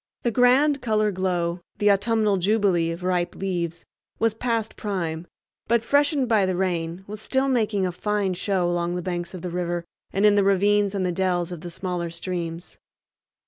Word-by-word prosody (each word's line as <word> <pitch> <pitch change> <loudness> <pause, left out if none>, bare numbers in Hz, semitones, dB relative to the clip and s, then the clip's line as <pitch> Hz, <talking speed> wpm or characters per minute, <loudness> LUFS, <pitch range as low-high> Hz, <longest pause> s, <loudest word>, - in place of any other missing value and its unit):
The 235 - +1
grand 265 +5 +4
color 215 -2 +1
glow—the 180 +1 0
autumnal 210 0 +2
jubilee 190 -3 +2
of 165 +2 -5
ripe 180 -1 0
leaves—was 180 +4 -3
past 225 -1 -2
prime, 175 -5 -3 0.4
but, 235 0 +2
freshened 285 0 +2
by 215 -5 +3
the 185 - 0
rain, 175 -1 -2
was 210 +1 -7
still 265 +4 +1
making 215 -6 +1
a 180 - -1
fine 205 +1 -1
show 185 0 0
along 175 0 -1
the 180 - -3
banks 175 0 -4
of 180 - -8
the 180 - -4
river 175 -1 -2 0.3
and 195 +2 +2
in 210 - +6
the 205 -1 +4
ravines 200 +1 +3
and 190 -2 0
the 180 - 0
dells 180 -1 0
of 175 -3 -6
the 175 - -6
smaller 175 -1 -3
streams. 170 0 -5
190 Hz, 175 wpm, -24 LUFS, 175-210 Hz, 0.4 s, in